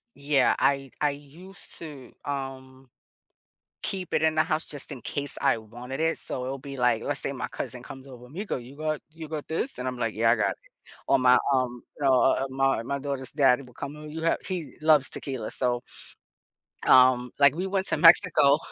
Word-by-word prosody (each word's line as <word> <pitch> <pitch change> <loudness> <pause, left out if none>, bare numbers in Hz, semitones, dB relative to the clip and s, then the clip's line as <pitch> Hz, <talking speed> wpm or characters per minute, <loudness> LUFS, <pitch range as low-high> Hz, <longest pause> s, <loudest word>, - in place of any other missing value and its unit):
Yeah. 140 -2 +2
I 135 -2 +1
I 150 - +4
used 160 +7 -10
to, 145 -6 -10
um, 135 -2 -6 0.9
keep 185 -3 -3
it - - +2
in 160 0 +2
the 155 - +4
house 160 0 -1
just 145 -2 -8
in 125 - -7
case 145 -1 -4
I - - +3
wanted 120 +6 -7
it. 165 0 +1
So 125 - -5
it'll 135 +2 -3
be 140 +1 -8
like, 125 -3 +2
let's 145 -1 -2
say - - -2
my 125 -2 -4
cousin 125 -1 -6
comes 135 0 -10
over, 125 -2 -12
"Me 175 +10 -6
go, 205 - -3
you 125 +3 -11
got 155 0 -2
you 160 -1 -9
got 155 -2 -5
this?" 165 - -2
And 125 - -4
I'm 125 -1 -3
like, 115 -3 -1
"Yeah. 115 +1 +3
I - - +5
got 110 - +1
it." - - -6 0.5
Or 135 - +4
my, 125 0 +6 0.2
um, 125 -2 -1 0.2
uh, 135 -1 +5
um, - - -1
my 135 -3 +2
my 140 +3 -2
daughter's 140 -2 -4
daddy 135 -3 +4
will 125 -1 -16
come 145 +4 -7
over. 150 0 -9
"You 160 +2 -6
have" 165 - +2
he 180 -5 -5
loves 155 -3 +4
tequila. 130 -6 -5
So 120 -1 0 1.1
um, 125 -1 +6
like, 140 +1 +6
we 185 +2 -2
went 190 -1 -1
to - - 0
Mexico. 165 -4 +6
135 Hz, 210 wpm, -27 LUFS, 125-155 Hz, 1.1 s, my